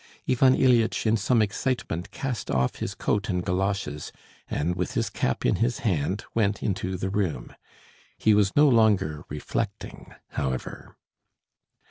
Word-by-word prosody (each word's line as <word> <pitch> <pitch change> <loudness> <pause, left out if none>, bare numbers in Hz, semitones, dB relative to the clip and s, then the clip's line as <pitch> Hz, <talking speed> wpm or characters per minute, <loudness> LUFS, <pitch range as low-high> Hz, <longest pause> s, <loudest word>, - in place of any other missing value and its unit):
Ivan 130 +1 +4
Ilyitch 120 -4 +3
in 110 0 +4
some 115 +2 +2
excitement 105 -5 -2
cast 125 -5 -4
off 65 -1 0
his - - -4
coat 105 +1 -1
and 90 -2 -1
galoshes, 95 -5 -2 0.4
and 85 +4 -1
with 90 -1 -3
his - - 0
cap 65 - -1
in - - +3
his 120 +4 0
hand 95 +1 0
went 105 -2 0
into 95 -2 -2
the 95 +1 -3
room. 90 -12 -2 0.6
He 110 - +3
was 105 -2 +2
no 150 +1 +6
longer 105 - +3
reflecting, 75 +1 -5
however. 65 -2 -4
100 Hz, 140 wpm, -26 LUFS, 85-115 Hz, 0.6 s, no